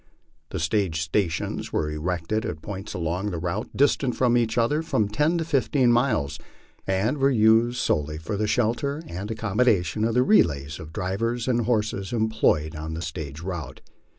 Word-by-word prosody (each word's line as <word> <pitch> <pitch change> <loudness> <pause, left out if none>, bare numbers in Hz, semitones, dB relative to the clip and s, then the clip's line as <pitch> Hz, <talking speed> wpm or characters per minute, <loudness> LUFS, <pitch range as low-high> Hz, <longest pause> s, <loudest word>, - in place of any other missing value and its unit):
The - - -4
stage 80 0 0
stations 80 +1 -1
were 75 -1 -1
erected 90 +7 -2
at 95 -9 -5
points 100 0 -6
along 90 +4 -2
the 90 - -4
route 90 +6 -3
distant 135 -2 +2
from 125 -2 +3
each 115 -2 +1
other 120 +7 +2
from 110 -10 0
ten 150 +11 +1
to 165 - -1
fifteen 135 -4 +2
miles, 120 - +1 0.5
and 100 +9 0
were 135 +1 +4
used 115 0 +4
sole 75 - +1
ly 75 0 -6
for 80 +6 -4
the 105 +1 0
shelter 125 +7 0
and 95 - -6
accommodation 110 -3 +1
of 115 +1 +1
the 125 - +5
relays 80 - +2
of 80 0 -9
drivers 115 +8 -2
and 120 -3 +1
horses 105 -5 0
em 110 -2 +1
ployed 80 -8 +1
on 80 +1 -5
the 85 - -4
stage 80 -3 -6
route. 85 -4 -6
105 Hz, 180 wpm, -25 LUFS, 85-120 Hz, 0.5 s, the